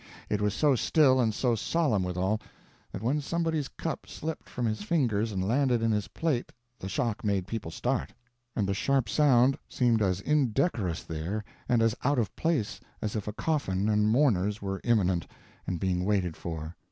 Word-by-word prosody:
It 105 Hz, -1 st, +1 dB
was 105 Hz, 0 st, +1 dB
so 150 Hz, -2 st, +4 dB
still, 130 Hz, +1 st, +4 dB
and 115 Hz, -2 st, +2 dB
so 120 Hz, +3 st, +1 dB
solemn 115 Hz, -, +1 dB
withal, 95 Hz, +4 st, -1 dB, 0.5 s
that 100 Hz, -, -6 dB
when 140 Hz, +6 st, +1 dB
somebody's 160 Hz, -1 st, -1 dB
cup 165 Hz, -, -5 dB
slipped 160 Hz, 0 st, -6 dB
from 125 Hz, -, -3 dB
his 110 Hz, -2 st, -1 dB
fingers 115 Hz, -5 st, +1 dB
and 95 Hz, -1 st, -1 dB
landed 125 Hz, -1 st, +2 dB
in 115 Hz, -, +2 dB
his 105 Hz, -1 st, 0 dB
plate 150 Hz, -7 st, -1 dB, 0.3 s
the 95 Hz, -, -5 dB
shock 110 Hz, +2 st, -1 dB
made 100 Hz, -3 st, 0 dB
people 110 Hz, -4 st, -4 dB
start, 125 Hz, +9 st, -2 dB, 0.4 s
and 105 Hz, -4 st, 0 dB
the 100 Hz, -, +1 dB
sharp 135 Hz, +4 st, +1 dB
sound 135 Hz, +1 st, +4 dB
seemed 120 Hz, -3 st, +2 dB
as 95 Hz, -2 st, +1 dB
indecorous 115 Hz, -, +1 dB
there 85 Hz, +7 st, -4 dB, 0.3 s
and 120 Hz, -2 st, +4 dB
as 115 Hz, -1 st, +3 dB
out 140 Hz, +2 st, +2 dB
of 115 Hz, -4 st, -1 dB
place 160 Hz, -10 st, 0 dB, 0.2 s
as 105 Hz, 0 st, -3 dB
if 105 Hz, -2 st, -3 dB
a 105 Hz, -, -3 dB
coffin 105 Hz, -9 st, 0 dB
and 105 Hz, 0 st, +3 dB
mourners 105 Hz, -5 st, +2 dB
were 95 Hz, -1 st, -4 dB
imminent 95 Hz, -7 st, +2 dB, 0.4 s
and 90 Hz, -2 st, -2 dB
being 90 Hz, 0 st, 0 dB
waited 95 Hz, -4 st, 0 dB
for. 80 Hz, 0 st, -6 dB
110 Hz, 180 wpm, -29 LUFS, 95-135 Hz, 0.5 s, so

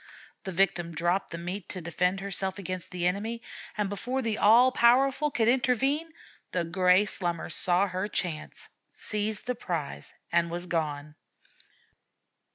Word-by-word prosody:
The 190 Hz, -, -3 dB
victim 175 Hz, -2 st, +1 dB
dropped 175 Hz, +4 st, 0 dB
the 170 Hz, -, -5 dB
meat 180 Hz, +2 st, -5 dB
to 185 Hz, -, -4 dB
defend 180 Hz, +3 st, 0 dB
herself 195 Hz, -1 st, -3 dB
against 185 Hz, -2 st, -5 dB
the 180 Hz, -1 st, -2 dB
enemy, 215 Hz, +6 st, -1 dB, 0.3 s
and 210 Hz, -1 st, +1 dB
before 245 Hz, +6 st, -2 dB
the 220 Hz, -2 st, -1 dB
'all 240 Hz, +5 st, +6 dB
powerful' 270 Hz, +5 st, +4 dB
could 225 Hz, -5 st, +1 dB
intervene, 265 Hz, +6 st, +2 dB, 0.4 s
the 180 Hz, -, +1 dB
gray 180 Hz, +3 st, +3 dB
Slummer 175 Hz, -4 st, -2 dB
saw 180 Hz, +2 st, +3 dB
her 185 Hz, +1 st, -3 dB
chance, 170 Hz, -6 st, -4 dB, 0.2 s
seized 210 Hz, 0 st, -3 dB
the 250 Hz, -, 0 dB
prize, 165 Hz, -, -4 dB, 0.2 s
and 170 Hz, 0 st, +2 dB
was 175 Hz, +1 st, -3 dB
gone. 150 Hz, -4 st, -2 dB
190 Hz, 145 wpm, -28 LUFS, 175-225 Hz, 0.4 s, all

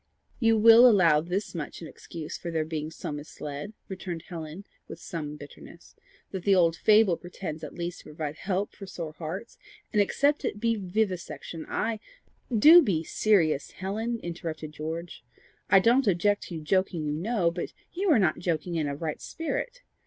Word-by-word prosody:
"You 225 Hz, -2 st, +4 dB
will 230 Hz, +3 st, +9 dB
allow 170 Hz, -8 st, +5 dB
this 180 Hz, +5 st, -3 dB
much 165 Hz, -5 st, -5 dB
in 165 Hz, -, -8 dB
excuse 160 Hz, -1 st, -8 dB
for 175 Hz, -, -6 dB
their 160 Hz, -2 st, -1 dB
being 155 Hz, -1 st, -4 dB
so 160 Hz, -, -6 dB
misled," 145 Hz, +4 st, -7 dB
returned 180 Hz, -3 st, -6 dB
Helen, 165 Hz, +2 st, -7 dB, 0.2 s
with -, -, -9 dB
some 150 Hz, -3 st, -5 dB
bitterness, 145 Hz, -1 st, -13 dB, 0.4 s
"that 190 Hz, -2 st, -5 dB
the 200 Hz, -1 st, +4 dB
old 165 Hz, -2 st, +4 dB
fable 210 Hz, -3 st, +4 dB
pretends 175 Hz, -3 st, -7 dB
at -, -, -7 dB
least 175 Hz, 0 st, -4 dB
to -, -, -16 dB
provide 150 Hz, 0 st, -5 dB
help 195 Hz, +1 st, -2 dB
for 195 Hz, -, -10 dB
sore 165 Hz, -4 st, -6 dB
hearts; 170 Hz, +8 st, -7 dB, 0.3 s
and 210 Hz, -, +4 dB
except 285 Hz, +8 st, +2 dB
it 205 Hz, -, -2 dB
be 230 Hz, +1 st, +1 dB
vivisection, 185 Hz, -4 st, -3 dB
I 220 Hz, 0 st, -1 dB, 0.3 s
" 240 Hz, -, -6 dB
"Do 345 Hz, +2 st, +11 dB
be 170 Hz, -, 0 dB
serious, 165 Hz, -6 st, +2 dB
Helen," 220 Hz, +5 st, -3 dB
interrupted 165 Hz, -3 st, -5 dB
George. 160 Hz, 0 st, -6 dB, 0.5 s
"I 195 Hz, -, +7 dB
don't 240 Hz, +5 st, +3 dB
object 205 Hz, +2 st, +2 dB
to 170 Hz, -3 st, -5 dB
joking, 175 Hz, 0 st, 0 dB
you 150 Hz, -, -1 dB
know, 175 Hz, +1 st, 0 dB
but 175 Hz, +1 st, -5 dB, 0.2 s
you 385 Hz, +2 st, 0 dB
are 300 Hz, -, +6 dB
not 180 Hz, -7 st, +2 dB
joking 170 Hz, 0 st, -2 dB
in 155 Hz, -2 st, 0 dB
a 140 Hz, -, -3 dB
right 155 Hz, 0 st, -4 dB
spirit. -, -, -4 dB
175 Hz, 175 wpm, -27 LUFS, 160-210 Hz, 0.5 s, Do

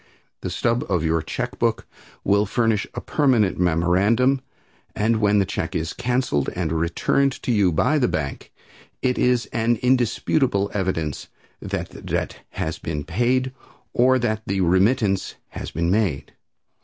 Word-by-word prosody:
The -, -, -3 dB
stub 120 Hz, +1 st, 0 dB
of 90 Hz, -5 st, +1 dB
your 80 Hz, 0 st, +1 dB
check -, -, -4 dB
book -, -, 0 dB, 0.4 s
will 100 Hz, +1 st, +2 dB
furnish 110 Hz, -1 st, +1 dB
a -, -, -3 dB
permanent 125 Hz, -, +2 dB
memorandum, 95 Hz, +10 st, +2 dB, 0.5 s
and 110 Hz, +2 st, +2 dB
when 105 Hz, 0 st, +3 dB
the 100 Hz, -, +3 dB
check -, -, -4 dB
is 80 Hz, 0 st, -2 dB
canceled 125 Hz, -, 0 dB
and 85 Hz, -3 st, -1 dB
returned 85 Hz, +12 st, +1 dB
to -, -, 0 dB
you 100 Hz, -5 st, +3 dB
by 150 Hz, -, +2 dB
the 125 Hz, -, +3 dB
bank, 75 Hz, -3 st, -4 dB, 0.5 s
it 125 Hz, -1 st, +1 dB
is 125 Hz, -1 st, +2 dB
an 115 Hz, 0 st, +2 dB
indisputable 125 Hz, -3 st, +1 dB
evidence 90 Hz, -7 st, -2 dB, 0.3 s
that -, -, -4 dB
the -, -, -12 dB
debt -, -, -3 dB, 0.2 s
has 80 Hz, -, -3 dB
been 75 Hz, -2 st, -4 dB
paid, 125 Hz, -, 0 dB, 0.4 s
or 130 Hz, +2 st, +4 dB
that 110 Hz, -3 st, -1 dB
the 95 Hz, 0 st, 0 dB
remittance 95 Hz, +3 st, +2 dB
has -, -, -6 dB
been 85 Hz, +2 st, -1 dB
made. 90 Hz, -9 st, 0 dB
105 Hz, 150 wpm, -23 LUFS, 85-125 Hz, 0.5 s, or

